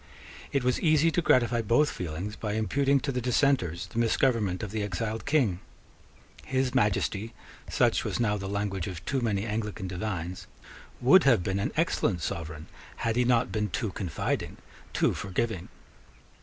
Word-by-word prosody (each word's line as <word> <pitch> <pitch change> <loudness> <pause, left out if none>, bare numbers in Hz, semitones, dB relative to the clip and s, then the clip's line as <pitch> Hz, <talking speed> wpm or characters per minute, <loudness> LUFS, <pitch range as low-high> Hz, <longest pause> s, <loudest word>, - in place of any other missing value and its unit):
It 140 -2 +1
was 125 0 +1
easy 155 0 +4
to 175 - +1
gratify 120 -6 +3
both 120 +7 +3
feelings 90 +5 -5
by 105 -2 -3
imputing 135 +6 +2
to 140 - -1
the 125 -1 -2
dissenters 120 - +1
the 95 +6 -5
misgovernment 115 -5 +1
of 105 - -5
the 110 0 -2
exiled 105 +3 -3
King. 125 - +2 0.8
His 130 -1 0
Majesty 105 -1 0 0.3
such - - +2
was - - -2
now 105 -3 +2
the 95 -1 -4
language 100 -2 -2
of 90 -3 -7
too 135 -2 0
many 105 -3 0
Anglican 105 -2 -3
divines 90 -2 -4 0.5
would 135 +9 +6
have 120 -10 +5
been 95 +2 -1
an 100 - -1
excellent 115 - +1
sovereign 80 -2 -4 0.4
had 115 -1 +1
he 125 0 +3
not 125 0 +2
been 105 -1 -1
too 100 +4 -2
confiding, 90 -4 -3 0.3
too - - +2
forgiving. 95 -1 -3
110 Hz, 160 wpm, -28 LUFS, 95-125 Hz, 0.8 s, would